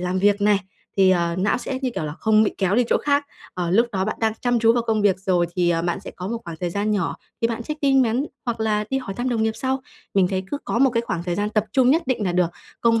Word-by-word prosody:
làm 180 +1 -1
việc 205 +1 +3
này, 205 -1 +4 0.4
thì, 190 -1 +5
à, 170 -1 +1
não 205 +5 +1
sẽ, 260 +1 -4
như 255 - 0
kiểu 155 - -2
là, 150 - -4
không 220 0 +4
bị 210 - 0
kéo 190 0 +1
đi 245 +1 +4
chỗ - - +4
khác, 285 0 +2 0.3
ờ, 175 -2 -2
lúc 230 +6 +4
đó 190 -1 0
bạn 215 - -2
đang 220 -1 +2
chăm 245 -1 +2
chú 230 0 +5
vào 240 -1 +1
công 220 -2 +1
việc 190 -2 +3
rồi 180 -3 +1
thì, 175 -1 +3
à, 165 0 +1
bạn 175 +1 -1
sẽ 195 - -8
có 180 +1 -7
một 230 +2 -2
khoảng 170 -2 -7
thời 175 -1 -1
gian 205 +3 -1
nhỏ, 180 -8 0 0.2
thì 230 - +2
bạn 230 0 -3
check 300 +4 -5
tin 270 -2 +4
mắn 245 +4 +1 0.2
hoặc 235 -2 -3
là 210 -1 +1
đi 270 - +1
hỏi 195 -7 -6
thăm 245 +4 -2
đồng 230 -3 0
nghiệp 220 - +1
sau. 265 0 -1 0.3
Mình 190 -2 +4
thấy 190 0 -2
cứ 290 - -2
có - - -1
một 265 +1 +5
cái 230 -1 +1
khoảng 170 -3 -2
thời 175 -1 -2
gian 205 +2 -1
tập 215 -1 +1
trung 260 -2 +4
nhất 325 +5 +3
định 240 -5 0
nà 180 - 0
được, 180 -1 +2 0.3
công 230 -1 +3
210 Hz, 305 wpm, -22 LUFS, 185-240 Hz, 0.4 s, thì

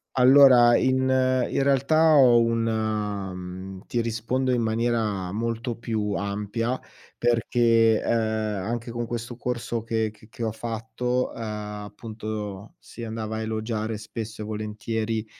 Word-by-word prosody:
Allora. 125 -2 +7
in 130 0 +2
in 130 0 +2
realtà 155 +4 +4
ho 120 -4 +7
una, 110 -4 -1
mhmm 90 +1 -7 0.2
ti 120 - -1
rispondo 115 +3 -1
in 120 - +2
maniera 110 -4 0
molto 115 +2 -2
più 110 -3 -2
ampia 105 +5 -2 0.4
perché, 115 -1 +3
ehm, - - -1 0.5
anche 115 +2 -3
con 120 0 -3
questo 120 +1 -5
corso 120 -2 -3
che 110 -1 -1
che 110 +1 -19
che 115 - -9
ho 110 - 0
fatto, 115 +2 -2
ehm, - - -9
appunto 105 -1 -6
si 115 - -9
andava 110 -1 -4
a 110 - -3
elogiare 110 0 -2
spesso 110 0 -7
e - - -4
volentieri 110 +1 -3
115 Hz, 130 wpm, -25 LUFS, 110-120 Hz, 0.5 s, Allora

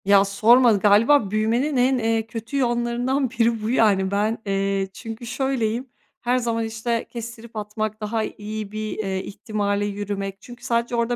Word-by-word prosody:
Ya, 200 0 +6
sorma 230 +5 +5
galiba 210 +3 +4
büyümenin 235 +7 +1
en, 255 +1 +3
eee, 225 -1 0
kötü 225 +4 -5
yanlarından 245 +1 0
biri 230 -2 +1
bu 215 - -1
yani 200 -6 +3
ben, 210 +3 +1
eee, 195 0 0
çünkü 225 +3 -8
şöyleyim 250 -1 -1 0.3
her 245 +1 +1
zaman, 230 -2 -1
işte, 230 +1 -2
kestirip 235 -1 -8
atmak, 215 0 -4
daha 220 +1 -1
iyi 215 -1 -6
bir, 215 0 -4
eee, 190 -3 -2
ihtimale 205 -1 -2
yürümek 200 -1 -4
çünkü 240 -1 -12
sadece 235 +1 0
orada 235 +1 +1
225 Hz, 155 wpm, -23 LUFS, 205-240 Hz, 0.3 s, Ya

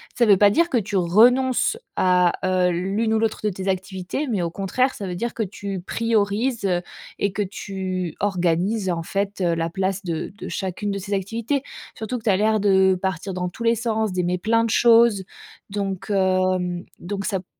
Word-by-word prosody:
ça 235 - +3
veut 200 -2 +6
pas 205 0 +6
dire 335 +8 +2
que 260 - +1
tu 205 -2 -2
renonces 245 - +4 0.2
à, 180 -1 +3
heu, 185 -1 +2
l'une 195 +6 0
ou - - +2
l'autre 225 -1 0
de 210 - +2
tes 190 0 -6
activités, 190 +7 -3
mais 200 -7 0
au 170 - -2
contraire, 225 +9 0
ça 200 - -6
veut 180 - -4
dire 235 +6 -3
que - - -4
tu 195 -1 -5
priorises 220 +2 0 0.5
et 200 - 0
que 210 - -2
tu 185 -3 -4
organises 185 +1 0
en 170 -1 -2
fait, 200 +3 -3
heu, 175 -2 +2
la 165 0 -1
place 190 +1 -2
de 165 -3 -3
de - - -7
chacune 195 +2 -3
de 200 - -3
ces 200 +1 -3
activités. 230 +8 -2 0.3
Surtout 225 +3 -4
que 225 - -19
tu - - +2
as 190 - +4
l'air 215 +1 +2
de 190 -2 +4
partir 190 0 -2
dans 180 0 -2
tous 230 - -8
les 230 0 +3
sens, 220 -2 -1
d'aimer 180 0 0
plein 230 +5 +2
de 230 - -1
choses, 230 -3 +5 0.5
donc, 195 0 -3
hem 185 -2 +1 0.2
donc 195 +2 -4
ça 195 -2 -1
p 180 - -14
195 Hz, 200 wpm, -23 LUFS, 185-220 Hz, 0.5 s, veut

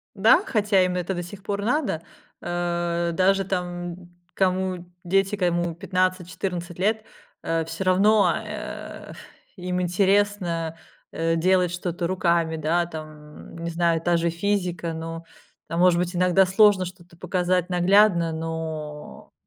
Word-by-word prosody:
Да, 210 +3 +5
хотя 210 -4 +2
им 180 0 0
это 180 +1 -2
до 175 - -3
сих 190 +3 -11
пор 200 -1 -3
надо, 250 - 0 0.4
э 175 -1 -1
даже 195 +2 +3
там 175 -1 -4 0.2
кому 185 -1 0 0.2
дети, 195 +3 +1
кому 175 -3 0
15-14 180 -1 -2
лет, 215 +3 +1 0.4
э, 165 -1 -1
всё 175 - -5
равно, 195 0 +4
э, - - -7
ф - - -12 0.4
им 180 0 -2
интересно, 180 -3 +1 0.3
э, 165 0 0
делать 180 +1 +2
что-то 175 -1 -3
руками, 170 -3 +1
да, 165 +3 +1
там 155 -2 -10
не 170 0 -4
знаю, 165 -1 +1
та 175 0 +2
же 170 0 +1
физика, 175 -1 -1
но, 165 +1 -6 0.4
а, 165 - -4
может 180 0 +5
быть 180 0 -2
иногда 180 +1 +4
сложно 190 0 +4
что-то 175 -1 -12
показать 180 0 0
наглядно, 180 -1 +4
но 160 -2 -6
175 Hz, 135 wpm, -24 LUFS, 170-190 Hz, 0.4 s, Да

